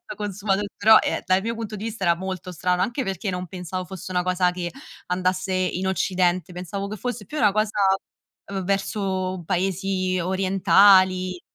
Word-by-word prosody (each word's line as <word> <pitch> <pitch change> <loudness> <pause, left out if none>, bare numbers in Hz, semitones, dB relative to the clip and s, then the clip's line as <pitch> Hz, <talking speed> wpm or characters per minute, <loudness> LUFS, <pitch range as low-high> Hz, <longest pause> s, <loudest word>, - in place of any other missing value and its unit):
esatto 355 - -9
consumato 205 -1 -1
però 220 +2 +7
ehm, - - -1
dal 185 0 +3
mio 230 +1 -2
punto 220 -2 -5
di 210 - -7
vista 225 -3 -5
era 170 -2 +3
molto 185 0 -5
strano, 180 +1 0
anche 240 +6 -1
perché 195 +1 -3
non 180 0 -4
pensavo 185 0 -5
fosse 185 0 -9
una 180 -1 0
cosa 180 0 +2
che 175 -1 -5 0.3
andasse 185 +1 -1
in 185 0 -1
Occidente, 185 -2 0
pensavo 190 +3 -5
che 215 - -5
fosse 245 -2 -5
più 305 - -8
una 210 -8 +4
cosa 215 0 0 0.7
v 195 -1 -3
verso 190 -2 -2
paesi 185 0 0
orientali. 185 0 +4
185 Hz, 170 wpm, -24 LUFS, 180-200 Hz, 0.7 s, però